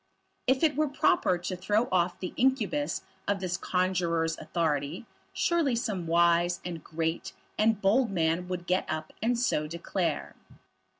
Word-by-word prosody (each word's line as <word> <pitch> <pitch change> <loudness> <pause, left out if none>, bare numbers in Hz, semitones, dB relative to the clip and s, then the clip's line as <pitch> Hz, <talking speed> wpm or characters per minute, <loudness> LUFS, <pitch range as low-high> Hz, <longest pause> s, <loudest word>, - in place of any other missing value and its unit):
If 260 +3 +3
it 310 -2 +4
were 305 +1 +2
proper 190 -9 +2
to 175 +2 -4
throw 210 +6 +1
off 180 -1 +1
the 180 - -5
incubus 265 +3 +1 0.2
of 200 -1 +1
this 185 -1 -2
conjuror's 175 -3 0
authority, 155 +2 -1 0.3
surely 330 -7 +1
some 210 -8 -2
wise, 170 +1 +3
and 170 -3 -5
great, 160 +1 -3 0.2
and 220 -1 +2
bold 220 +5 +3
man 170 -1 0
would 180 -1 -4
get 180 +1 0
up 155 0 -4
and 235 +2 +1
so 155 -11 +1
declare. 170 0 -2
180 Hz, 145 wpm, -29 LUFS, 170-225 Hz, 0.3 s, it